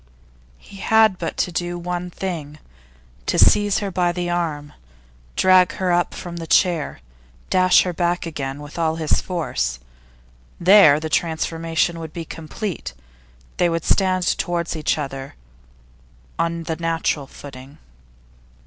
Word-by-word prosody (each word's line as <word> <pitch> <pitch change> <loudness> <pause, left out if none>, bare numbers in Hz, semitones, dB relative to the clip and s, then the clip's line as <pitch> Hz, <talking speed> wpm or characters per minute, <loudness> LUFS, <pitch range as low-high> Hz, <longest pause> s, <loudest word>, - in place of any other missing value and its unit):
He 200 - -14
had 220 -1 +3
but 165 - -4
to 180 - 0
do 175 0 -3
one 180 +1 -4
thing: 165 -5 -5 0.7
to - - +1
seize 205 -1 +4
her 195 - -3
by 175 -1 +1
the 175 0 -3
arm, 155 -4 -2 0.6
drag 185 -1 +5
her 185 -1 -1
up 175 0 +1
from 175 -1 -7
the 165 -1 -6
chair, 165 - +2 0.5
dash 185 0 +5
her 180 - -3
back 175 +1 0
again 145 -3 -5
with 145 +3 -9
all 160 -1 +1
his 160 -2 +1
force 150 - -2 0.8
there, 175 -5 +7
the 160 - -4
transformation 165 +1 -1
would 160 -1 -8
be 170 -1 -5
complete, 165 - -6 0.6
they 175 - +3
would 165 -1 -2
stand 185 -2 +2
towards 170 -1 -2
each 155 0 0
other 135 -2 -6 1.0
on 165 0 -1
the 160 0 -3
natural 165 -4 -1
footing. 135 0 -12
170 Hz, 140 wpm, -21 LUFS, 155-180 Hz, 1.0 s, there